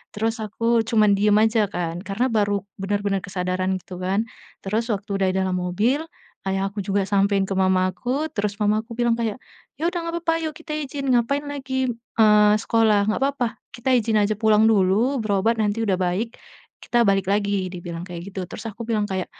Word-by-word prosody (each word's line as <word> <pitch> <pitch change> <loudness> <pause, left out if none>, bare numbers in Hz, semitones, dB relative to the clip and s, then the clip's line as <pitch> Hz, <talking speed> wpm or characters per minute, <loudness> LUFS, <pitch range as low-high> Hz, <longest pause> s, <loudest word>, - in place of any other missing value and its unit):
terus 225 +2 -1
aku 230 +2 +1
cuman 215 -3 +4
diem 210 +1 +3
aja 220 -1 +3
kan 170 -1 -3
karena 210 +6 0
baru 205 -3 +1 0.2
benar-benar 200 0 0
kesadaran 185 0 -1
gitu 180 0 -9
kan, 195 +4 +1 0.4
terus 220 +4 -1
waktu 205 0 -3
udah 190 - +3
di 185 - -5
dalam 185 -1 -1
mobil, 220 - 0 0.4
Ayah 195 +1 0
aku 210 - -24
juga 200 +1 0
sampein 200 0 +2
ke 195 - -3
mama 185 -1 +3
aku, 265 +10 -2
terus 205 -1 -1
mama 210 +1 +2
aku 235 - -9
bilang 240 -1 +2
kayak, 225 -1 -1 0.4
"Ya 330 - +2
udah 355 - -5
nggak 335 - -3
apa-apa, 330 -1 +1
ayo 315 - -1
kita 325 -1 -7
izin 275 -2 -4
ngapain 245 +4 +2
lagi, 260 -2 -2 0.3
eee, 210 -1 +6
sekolah, 215 -3 +3
nggak - - -1
apa-apa, 275 -3 +1 0.3
kita 245 +2 -3
izin 225 -2 +1
aja 205 +1 +2
pulang 220 -1 +4
dulu 215 +6 +3
berobat 215 +2 +1
nanti 210 +1 0
udah 195 - +2
baik, 190 +6 -2 0.4
kita 240 - +1
balik 195 -1 +2
lagi," 200 -1 +1
dibilang 175 -1 -6
kayak 175 +1 -7
gitu. 190 -1 -4
Terus 220 - -8
aku 230 +3 -8
bilang 215 -3 +1
kayak, 190 -1 -2
210 Hz, 190 wpm, -23 LUFS, 195-230 Hz, 0.4 s, eee